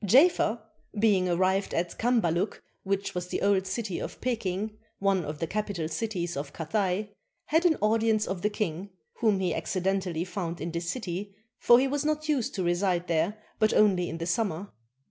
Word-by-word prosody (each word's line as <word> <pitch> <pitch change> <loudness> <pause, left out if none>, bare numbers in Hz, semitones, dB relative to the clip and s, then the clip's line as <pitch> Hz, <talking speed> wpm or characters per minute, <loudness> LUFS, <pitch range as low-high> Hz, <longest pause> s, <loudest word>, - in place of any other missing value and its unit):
Jafer, 245 - +5 0.4
being 200 -4 +3
arrived 185 +3 +1
at 170 0 -1
Cambaluc 210 -6 +1 0.2
which 195 0 -2
was 180 0 -3
the - - -3
old 195 -1 +3
city 195 -1 -3
of - - -6
Peking, 215 -3 -2 0.2
one 195 -2 +2
of 150 0 -5
the 165 - -1
capital 200 -3 -2
cities 175 0 -3
of 140 0 -5
Cathay, 195 +4 -1 0.3
had 320 +3 +2
an 315 - +2
audience 220 0 +3
of 190 -2 -3
the 210 - +2
king, 195 -2 -3 0.3
whom 215 -5 +3
he 180 -3 0
accidentally 185 -3 -1
found 175 -3 -4
in 170 - -3
this 170 +1 -3
city, 195 -3 -4 0.2
for 240 - +7
he 270 - +2
was 285 +1 -1
not 305 0 -1
used 280 -7 0
to 190 - -1
reside 175 0 +1
there 170 +5 +1 0.2
but 215 -1 +3
only 190 -4 +4
in 165 - -4
the 165 - -3
summer. 190 0 -1
195 Hz, 180 wpm, -28 LUFS, 175-215 Hz, 0.4 s, for